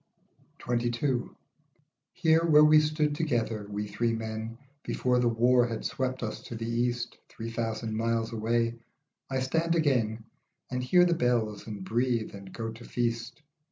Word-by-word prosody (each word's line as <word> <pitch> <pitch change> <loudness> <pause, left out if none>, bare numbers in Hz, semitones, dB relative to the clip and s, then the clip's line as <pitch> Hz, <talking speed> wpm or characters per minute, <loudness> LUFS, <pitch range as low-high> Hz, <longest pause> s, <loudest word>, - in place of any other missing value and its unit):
XXII. 120 +1 0 0.9
HERE, 165 -2 +3
where 150 -2 +7
we 155 0 +7
stood 150 0 +1
together, 115 -9 -1
we 105 0 -3
three 115 +3 0
men, 110 0 -4 0.2
Before 125 -1 +1
the 120 - +2
war 120 +2 +4
had 115 -1 -5
swept 130 -1 -2
us 110 - -4
to 120 - -8
the 115 0 -4
East, 120 +1 -1
Three 115 +1 -7
thousand 115 -1 -2
miles 115 0 0
away, 115 +1 0 0.5
I 130 -1 -1
stand 165 +6 +1
agen 120 -8 +1 0.5
And 125 0 -1
hear 180 +7 +5
the 175 - +3
bells, 120 -8 0
and 105 -3 -6
breathe, 115 +1 0
and 100 -1 -10
go 115 -1 -4
to 115 +1 -11
feast. 115 +4 -3
120 Hz, 155 wpm, -29 LUFS, 115-130 Hz, 0.9 s, where